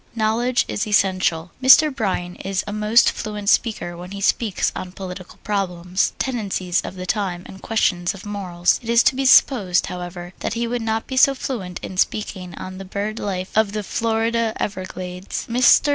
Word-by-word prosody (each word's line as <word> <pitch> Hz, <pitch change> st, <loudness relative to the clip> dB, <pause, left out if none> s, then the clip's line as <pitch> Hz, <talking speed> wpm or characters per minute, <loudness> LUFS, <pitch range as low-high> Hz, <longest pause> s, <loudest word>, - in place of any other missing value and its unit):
Knowledge 230 Hz, +3 st, +1 dB
is 210 Hz, -, -2 dB
Essential 185 Hz, -5 st, +1 dB
Mr. 285 Hz, +2 st, +7 dB
Bryan 180 Hz, -5 st, -2 dB
is 195 Hz, -1 st, -2 dB
a 205 Hz, -, -5 dB
most 215 Hz, +2 st, +4 dB
fluent 210 Hz, -1 st, -4 dB
speaker 210 Hz, -8 st, +1 dB
when 175 Hz, +1 st, -9 dB
he 200 Hz, +1 st, -7 dB
speaks 205 Hz, 0 st, +1 dB
on 180 Hz, -1 st, -6 dB
political 185 Hz, -1 st, -8 dB
problems, 180 Hz, -3 st, -1 dB
tendencies 195 Hz, -8 st, -1 dB
of -, -, -7 dB
the 185 Hz, 0 st, -6 dB
time, 185 Hz, -3 st, -2 dB
and 190 Hz, -, -12 dB
questions 185 Hz, -4 st, 0 dB
of 195 Hz, -, -11 dB
morals. 185 Hz, -4 st, 0 dB
It 230 Hz, -, -9 dB
is 235 Hz, +1 st, +5 dB
to 265 Hz, -, +3 dB
be 270 Hz, +1 st, -1 dB
supposed, 210 Hz, -8 st, +5 dB
however, 175 Hz, 0 st, -7 dB
that -, -, -3 dB
he 235 Hz, +1 st, -1 dB
would 240 Hz, +1 st, -2 dB
not 220 Hz, 0 st, -1 dB
be 260 Hz, -, -5 dB
so 275 Hz, +1 st, +6 dB
fluent 200 Hz, -10 st, -4 dB
in 185 Hz, -, -7 dB
speaking 185 Hz, -2 st, -1 dB
on 185 Hz, 0 st, -8 dB
the -, -, -6 dB
bird 205 Hz, +3 st, -4 dB
life 185 Hz, -2 st, -4 dB
of 215 Hz, -2 st, +2 dB
the 210 Hz, -1 st, -2 dB
Florida 225 Hz, +1 st, 0 dB
Everglades. 185 Hz, -1 st, -5 dB
Mr. 250 Hz, +4 st, +5 dB
200 Hz, 180 wpm, -21 LUFS, 185-225 Hz, -, Mr